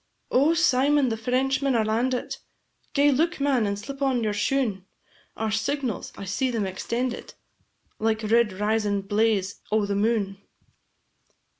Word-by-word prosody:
"O 290 Hz, +6 st, +4 dB
Symon, 285 Hz, -3 st, +3 dB
the -, -, 0 dB
Frenchmen 265 Hz, +3 st, 0 dB
are 220 Hz, -2 st, +2 dB
landit! 245 Hz, +4 st, -1 dB, 0.6 s
Gae 285 Hz, 0 st, +5 dB
look 325 Hz, +5 st, +1 dB
man, 270 Hz, -6 st, +2 dB
and 200 Hz, 0 st, -2 dB
slip 275 Hz, +7 st, -8 dB
on 260 Hz, -4 st, +1 dB
your 210 Hz, -1 st, 0 dB
shoon; 210 Hz, -2 st, 0 dB, 0.5 s
Our 220 Hz, 0 st, -1 dB
signals 245 Hz, +2 st, -2 dB
I 195 Hz, -, -6 dB
see 255 Hz, +8 st, -1 dB
them 230 Hz, -4 st, -1 dB
extendit, 235 Hz, +6 st, -3 dB, 0.6 s
Like 220 Hz, 0 st, 0 dB
red 225 Hz, 0 st, +3 dB
risin' 210 Hz, +1 st, 0 dB
blaze 205 Hz, -1 st, 0 dB
o' 215 Hz, -1 st, +2 dB
the 200 Hz, -, -2 dB
moon!" 200 Hz, -2 st, 0 dB
225 Hz, 140 wpm, -25 LUFS, 210-265 Hz, 0.6 s, Gae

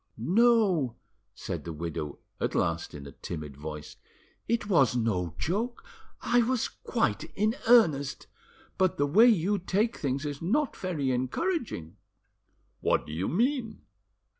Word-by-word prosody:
"No," 185 Hz, -, +3 dB, 0.4 s
said -, -, -5 dB
the 85 Hz, -, -5 dB
widow 75 Hz, -2 st, -5 dB, 0.2 s
at -, -, -1 dB
last 85 Hz, 0 st, -1 dB
in 70 Hz, -1 st, -8 dB
a 70 Hz, -, -9 dB
timid 75 Hz, -1 st, -7 dB
voice, 75 Hz, +1 st, -8 dB, 0.5 s
"it 235 Hz, -1 st, 0 dB
was 140 Hz, -, +4 dB
no 90 Hz, -9 st, -1 dB
joke; 225 Hz, +8 st, -2 dB, 0.4 s
I 240 Hz, +1 st, +4 dB
was 245 Hz, 0 st, +1 dB
quite 155 Hz, -, -1 dB
in 215 Hz, +3 st, +1 dB
earnest. 155 Hz, -, +4 dB, 0.5 s
But 185 Hz, -2 st, +2 dB
the 145 Hz, -, +2 dB
way 205 Hz, +12 st, +6 dB
you 205 Hz, -2 st, +3 dB
take 205 Hz, +6 st, 0 dB
things 140 Hz, 0 st, -2 dB
is 145 Hz, -1 st, -4 dB
not 265 Hz, -, 0 dB
very 155 Hz, -8 st, -2 dB
encouraging." 130 Hz, -, -2 dB, 0.8 s
"What -, -, +1 dB
do 75 Hz, -, -8 dB
you 90 Hz, +5 st, -2 dB
mean?" 240 Hz, -, 0 dB
160 Hz, 140 wpm, -28 LUFS, -, 0.8 s, way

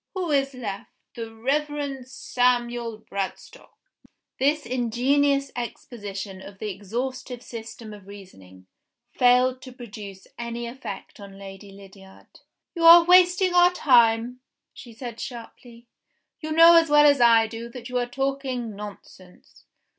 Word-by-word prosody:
Who 360 Hz, -4 st, -3 dB
is 275 Hz, -1 st, 0 dB
left? 205 Hz, -6 st, -6 dB, 0.2 s
The 230 Hz, -1 st, -7 dB
Reverend 275 Hz, +2 st, -3 dB
Samuel 240 Hz, -3 st, -1 dB
Bradstock." 195 Hz, -1 st, -6 dB, 0.7 s
This 290 Hz, +3 st, +1 dB
ingenious 270 Hz, +4 st, 0 dB
exposition 205 Hz, -5 st, -7 dB
of 195 Hz, 0 st, -12 dB
"the 210 Hz, +1 st, -5 dB
exhaustive 245 Hz, +5 st, -6 dB
system 225 Hz, -2 st, -9 dB
of 200 Hz, -2 st, -14 dB
reasoning," 95 Hz, -, -14 dB, 0.5 s
failed 255 Hz, +1 st, +3 dB
to 255 Hz, -, -11 dB
produce 210 Hz, -6 st, -11 dB
any 235 Hz, 0 st, -5 dB
effect 235 Hz, -6 st, -9 dB
on 200 Hz, -1 st, -12 dB
Lady 195 Hz, 0 st, -11 dB
Lydiard. 195 Hz, -1 st, -17 dB, 0.3 s
"You 335 Hz, -, -4 dB
are 335 Hz, +1 st, +9 dB
wasting 360 Hz, +1 st, +4 dB
our 355 Hz, 0 st, +5 dB
time," 240 Hz, -5 st, +3 dB, 0.3 s
she 240 Hz, -, -12 dB
said 235 Hz, 0 st, -9 dB
sharply. 235 Hz, -1 st, -10 dB, 0.5 s
"You 310 Hz, -2 st, -6 dB
know 330 Hz, +2 st, +7 dB
as 330 Hz, -1 st, +3 dB
well 295 Hz, 0 st, +6 dB
as 285 Hz, -3 st, +4 dB
I 230 Hz, -1 st, +6 dB
do 230 Hz, +1 st, -8 dB
that 240 Hz, 0 st, -10 dB
you 250 Hz, -1 st, -2 dB
are 245 Hz, -, -2 dB
talking 265 Hz, -4 st, -3 dB
nonsense." 195 Hz, -3 st, -13 dB
240 Hz, 130 wpm, -24 LUFS, 210-275 Hz, 0.7 s, are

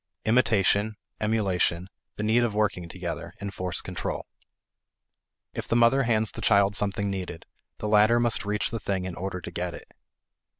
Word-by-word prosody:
Imitation, 110 Hz, -2 st, +3 dB, 0.2 s
emulation, 95 Hz, -5 st, +1 dB, 0.3 s
the 105 Hz, -, -4 dB
need 110 Hz, +3 st, +3 dB
of 115 Hz, -3 st, -1 dB
working 100 Hz, -5 st, 0 dB
together, 90 Hz, -1 st, -5 dB
enforce 90 Hz, -3 st, -3 dB
control. -, -, -4 dB, 1.3 s
If -, -, -5 dB
the -, -, +1 dB
mother 120 Hz, +3 st, +5 dB
hands 110 Hz, -4 st, +2 dB
the -, -, -8 dB
child 100 Hz, -1 st, +4 dB
something 100 Hz, 0 st, 0 dB
needed, 90 Hz, -3 st, -5 dB, 0.3 s
the 105 Hz, -, -4 dB
latter 105 Hz, +3 st, +5 dB
must 120 Hz, -1 st, +2 dB
reach 105 Hz, 0 st, -1 dB
the 115 Hz, -, -3 dB
thing 95 Hz, -3 st, -2 dB
in 95 Hz, -, -4 dB
order 95 Hz, +1 st, -4 dB
to 85 Hz, -, -8 dB
get 90 Hz, 0 st, -3 dB
it. -, -, -13 dB
105 Hz, 160 wpm, -27 LUFS, 95-110 Hz, 1.3 s, mother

